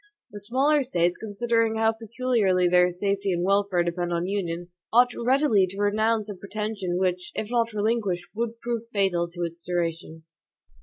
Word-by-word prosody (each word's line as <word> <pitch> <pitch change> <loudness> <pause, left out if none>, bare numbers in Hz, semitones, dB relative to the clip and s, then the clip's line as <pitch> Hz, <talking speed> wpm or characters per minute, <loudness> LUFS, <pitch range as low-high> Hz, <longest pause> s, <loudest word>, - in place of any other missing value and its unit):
The 205 - -8
smaller 270 +8 +2
States, 175 -9 0
considering 225 +1 0
how 225 0 +2
peculiarly 225 -5 +1
their 180 0 +4
safety 195 +2 -1
and 175 0 -1
welfare 195 -2 +2
depend 175 0 -2
on 170 0 -1
union, 175 -3 -3 0.2
ought 245 +2 +5
readily 240 -5 +3
to 190 +2 -10
renounce 215 +1 +1
a 205 - -5
pretension 200 -2 -4
which, 180 -1 -1
if 215 +1 -4
not 230 -1 +1
relinquished, 210 -4 -1
would 230 +1 -3
prove 235 -1 -2
fatal 190 -5 +1
to 175 0 -5
its 170 0 -5
duration. 165 -2 -3
200 Hz, 160 wpm, -25 LUFS, 175-225 Hz, 0.2 s, ought